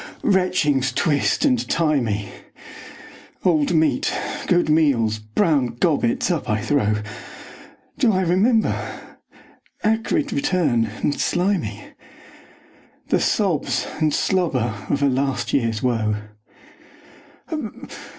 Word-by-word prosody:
Retchings 175 - +2
twist 145 - +1
and 255 -4 +1
tie 155 -3 +2
me, 105 -4 -3 1.1
Old 165 -2 +2
meat, 160 -1 +2 0.4
good 175 -2 +3
meals, 135 -9 +2
brown 125 - 0
gobbets, 235 - +1
up 165 -7 -2
I 110 0 +1
throw. 105 -4 0 1.0
Do 245 -6 +4
I 190 -2 +1
remember? 200 +6 +2 1.1
Acrid 225 +7 0
return 170 - +1 0.2
and 145 - +2
slimy, 175 - -1 1.3
The - - +3
sobs - - 0
and 155 -1 +2
slobber 140 -12 0 0.2
of 140 0 0
a - - +4
last 135 0 -1
years 115 -5 0
woe. 110 -4 +1
150 Hz, 100 wpm, -21 LUFS, 120-185 Hz, 1.3 s, Do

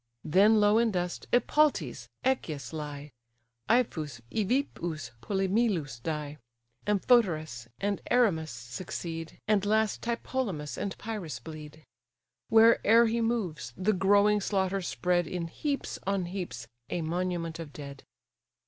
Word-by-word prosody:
Then 200 +7 +5
low 210 +1 +5
in 235 -1 +3
dust 180 -3 -3
Epaltes, 245 - +2 0.2
Echius, 155 - -1
lie; 150 -2 -6 0.6
Ipheas, 160 - +1
Evippus, 205 - -1
Polymelus, 190 - 0
die; 150 +1 -4 0.5
Amphoterus 175 - +2
and 200 0 -1
Erymas 190 -11 +3
succeed; 165 +7 -6
And 210 -2 +3
last 215 +1 +1
Tlepolemus 230 - -2
and 200 - -4
Pyres 200 - -5
bleed. 155 +3 -10 0.6
Where'er 225 0 +6
he 230 +1 0
moves, 180 - -2
the 195 +4 +2
growing 205 +2 +4
slaughters 190 -1 0
spread 175 -2 +1
In 175 0 -3
heaps 280 - -3
on 195 -2 +1
heaps 175 -11 -5 0.2
a 175 - -2
monument 170 0 -2
of 160 -3 -7
dead. 140 -2 -9
180 Hz, 115 wpm, -29 LUFS, 155-215 Hz, 0.6 s, Where'er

